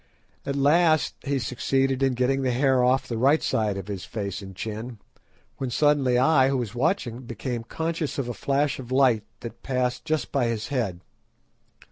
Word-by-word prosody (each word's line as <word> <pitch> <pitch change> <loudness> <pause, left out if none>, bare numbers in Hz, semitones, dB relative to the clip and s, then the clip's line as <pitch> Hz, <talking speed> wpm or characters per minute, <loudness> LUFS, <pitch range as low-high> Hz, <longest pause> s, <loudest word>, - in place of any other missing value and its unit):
At 140 - -1
last 155 +3 +3
he 140 -1 -1
succeeded 135 +2 0
in 135 -1 +3
getting 130 +2 +1
the 130 - 0
hair 130 0 +3
off 130 +2 +2
the 115 -2 -3
right 140 +6 +4
side 105 -3 0
of 100 -1 -6
his 100 -3 -5
face 100 -2 -4
and 95 -1 -10
chin, 110 +4 -5 0.6
when 130 - -3
suddenly 135 -1 +3
I, 135 0 +4
who 135 - +1
was 115 -4 -3
watching, 125 - 0
became 120 0 -5
conscious 160 +4 -3
of 135 -3 -2
a 120 - -3
flash 140 +3 0
of 125 -1 -9
light 130 -5 +3 0.2
that 115 0 -8
passed 125 -1 -1
just 155 -1 -2
by 135 -4 +1
his 115 -2 -3
head. 110 -11 -2
130 Hz, 180 wpm, -25 LUFS, 115-140 Hz, 0.6 s, right